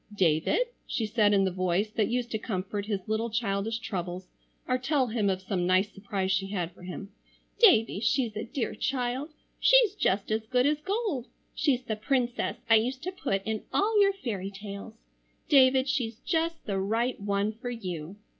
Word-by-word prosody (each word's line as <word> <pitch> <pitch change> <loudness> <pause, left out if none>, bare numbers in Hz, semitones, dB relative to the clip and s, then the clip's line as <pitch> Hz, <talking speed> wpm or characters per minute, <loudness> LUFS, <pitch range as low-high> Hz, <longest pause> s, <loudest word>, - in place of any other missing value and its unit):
"Davie," 160 -5 +2 0.3
she 225 - -1
said 215 -1 +3
in 200 -1 +4
the 190 - 0
voice 185 +3 0
that 220 -1 +1
used 245 0 -2
to 220 - -1
comfort 200 -1 -3
his 200 -3 -3
little 220 +2 0
childish 220 -1 -1
troubles, 180 -4 -5 0.4
or 255 0 +1
tell 270 +1 +1
him 220 -4 0
of 190 0 -2
some 185 -2 -1
nice 185 +3 +3
surprise 195 -1 -2
she 190 +1 +1
had 180 -4 -3
for 180 - -19
him, 185 +3 -7 0.5
"Davie, 225 - +5
she's 225 0 +1
a 215 - -3
dear 255 0 -3
child! 255 +3 -2 0.3
She's - - +6
just 200 - 0
as 220 0 -1
good 250 +1 +2
as 300 +1 +1
gold. 390 - -2 0.3
She's 260 -4 +1
the 225 -3 -2
princess 245 +2 -1
I 225 - +7
used 255 +4 -1
to 370 - -2
put 195 - -2
in 220 -1 -2
all 420 +1 +3
your 395 0 +4
fairy 210 - -4
tales. 200 +2 -8 0.5
David, 265 -2 +5
she's 235 -5 -1
just 330 0 -1
the 195 -2 -1
right 225 +6 0
one 200 +1 0
for 235 +3 -6
you!" 185 -7 -5
220 Hz, 185 wpm, -28 LUFS, 195-255 Hz, 0.5 s, I